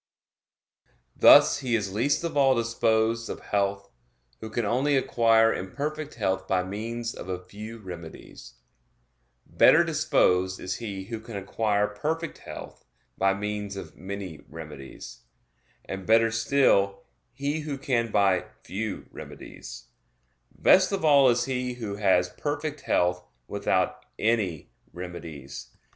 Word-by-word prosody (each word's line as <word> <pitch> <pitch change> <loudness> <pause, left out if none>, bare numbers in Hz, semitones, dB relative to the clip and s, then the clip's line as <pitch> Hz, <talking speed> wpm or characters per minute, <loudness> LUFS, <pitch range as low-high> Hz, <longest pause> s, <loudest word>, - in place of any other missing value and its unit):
Thus 145 0 +7
he 125 -4 0
is 100 -3 -2
least 140 +10 +1
of 170 - -3
all 135 -2 +4
disposed 115 0 +1
of - - -5
health, 100 -1 -1 0.5
who 110 - -7
can 115 0 -2
only 135 +6 +2
acquire 115 -3 +4
imperfect 150 +10 -4
health 95 -4 -1
by 95 -1 +1
means 115 +5 -4
of 95 - -9
a 90 0 -4
few 105 +4 -9
remedies; 85 - -10 0.9
better 170 - +5
disposed 95 - +2
is 95 +1 -4
he 100 -5 -5
who 115 +3 -6
can 110 -1 -8
acquire 105 +1 0
perfect 155 +11 -3
health - - -10 0.3
by 95 0 +2
means 105 0 -4
of 95 - -8
many 95 -4 -7
remedies; 75 -3 -10 0.7
and 95 -1 -6
better 115 0 +5
still, 115 -5 +2 0.3
he 140 +5 -2
who 150 -2 -4
can 120 -4 0
by 100 -4 +2 0.2
few 105 +1 -4
remedies; - - -10 0.6
best 185 +1 +4
of 195 -5 -1
all 140 -3 +6
is 120 0 +2
he 125 -1 -2
who 105 -4 -5
has 95 -3 +3
perfect 145 - -4
health 90 0 +1 0.2
without - - -1
any 105 -8 0 0.2
remedies. 85 -6 -8
110 Hz, 130 wpm, -26 LUFS, 95-125 Hz, 0.9 s, Thus